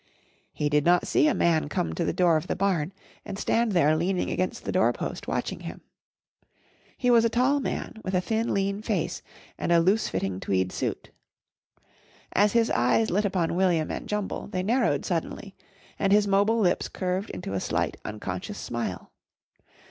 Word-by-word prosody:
He 150 - -1
did 150 0 +2
not 175 +2 +4
see - - +3
a 305 - +2
man 160 -3 +2
come 80 - -1
to - - -1
the - - 0
door 175 -3 +3
of 155 +3 -1
the - - -1
barn 185 -4 0 0.3
and 195 - -6
stand 225 +1 +1
there 155 -3 +4
leaning 180 +3 0
against 185 0 -2
the - - -1
door - - +3
post - - -5
watching - - -2
him. - - -8 1.2
He 250 -1 +2
was 230 -1 +6
a 230 - +3
tall 255 +5 +2
man 245 -4 -4
with 185 0 -2
a - - +4
thin, 225 +4 -1
lean 200 +1 0
face - - -2 0.4
and - - -1
a 170 - +6
loose 195 +6 +2
fitting 95 -1 -2
tweed 95 -1 0
suit. - - -4 1.2
As 205 +1 +3
his 230 -1 +3
eyes 125 - +2
lit 205 +4 +1
upon 185 -5 0
William 175 -4 +2
and - - -6
Jumble 210 -1 -3
they 185 -2 -3
narrowed 220 - +1
suddenly 185 +3 -3 0.5
and 195 -1 +1
his 205 0 +5
mobile 205 +3 +3
lips 180 -5 +2
curved 185 +2 -2
into 135 - -6
a 95 - 0
slight, - - -1
unconscious 180 - -5
smile. 115 -6 -4
185 Hz, 180 wpm, -26 LUFS, 160-210 Hz, 1.2 s, was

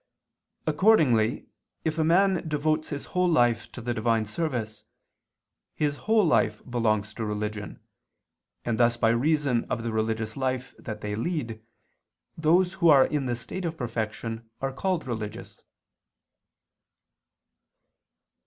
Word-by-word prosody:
Accordingly 135 - +3 0.4
if 160 0 -1
a - - +3
man 180 +1 +3
devotes 155 +1 0
his 145 -2 -5
whole 180 -1 +3
life 120 -7 +2
to 125 - -8
the 120 +1 -2
divine 115 -1 +1
service, 110 -4 -3 0.9
his 145 -1 0
whole 220 -3 +5
life 110 -9 +2
belongs 110 -3 0
to 115 - -5
religion, 105 -1 -4 0.9
and 120 -1 -1
thus 120 0 +4
by 115 - +3
reason 135 0 +2
of 115 - -3
the 115 - -2
religious 110 0 -1
life 130 -1 -2
that 110 -3 -7
they 105 0 -3
lead, 115 -2 -3 0.7
those 175 +3 +3
who 170 -3 +3
are 140 -3 +7
in 145 -3 -1
the 120 - 0
state 150 +10 -6
of 165 -1 -3
perfection 115 -1 -4
are 135 0 -2
called 180 +3 -1
religious. 110 -2 -6
120 Hz, 130 wpm, -27 LUFS, 110-155 Hz, 0.9 s, are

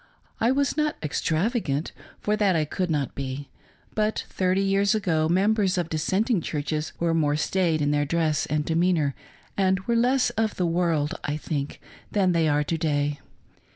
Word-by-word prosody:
I 230 - +3
was 275 +2 +1
not 300 -1 0
extravagant, 160 - -1 0.3
for 210 - 0
that 205 -4 +2
I 155 -2 +2
could 180 +4 -2
not 145 -4 -1
be; 135 0 -5 0.4
but 215 0 0
thirty 185 +1 +1
years 200 +2 +2
ago 160 -7 +1
members 195 +1 +2
of 175 -2 -1
.dissenting 190 +7 +1
churches 150 0 -3
were 170 -1 +1
more 150 -3 +2
staid 160 0 +1
in 145 - +2
their 145 0 +1
dress 155 -1 0
and 150 0 -1
demeanor 165 -3 +2 0.4
and 190 -1 +2
were 235 +4 -1
less 250 +2 +3
of 220 -1 -1
the 180 - 0
world, 165 -3 +1
I 145 +1 -2
think, 145 -2 -4 0.3
than 195 -3 +2
they 165 -2 +2
are 150 0 +2
to 165 +2 -2
day. 145 -2 0
170 Hz, 170 wpm, -25 LUFS, 150-200 Hz, 0.4 s, I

